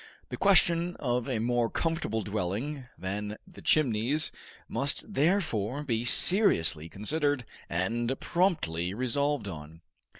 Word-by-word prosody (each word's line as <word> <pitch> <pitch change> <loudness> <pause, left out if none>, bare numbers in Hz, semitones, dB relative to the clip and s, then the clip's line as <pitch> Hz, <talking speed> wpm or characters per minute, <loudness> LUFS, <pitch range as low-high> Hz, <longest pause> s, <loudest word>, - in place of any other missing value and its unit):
The - - -4
question 175 -3 +4
of 125 -1 -1
a 125 - 0
more 120 +1 +1
comfortable 160 -9 -1
dwelling 110 +8 -3
than 105 +3 -4
the 185 -2 -14
Chimneys 135 +1 +2 0.4
must 140 +9 -1
therefore 145 - +1
be 115 -5 -1
seriously 85 - +3
considered 145 - -1 0.2
and 115 +9 -1
promptly 95 - 0
resolved 130 0 0
on. 80 -2 -9
120 Hz, 110 wpm, -29 LUFS, 105-150 Hz, 0.4 s, question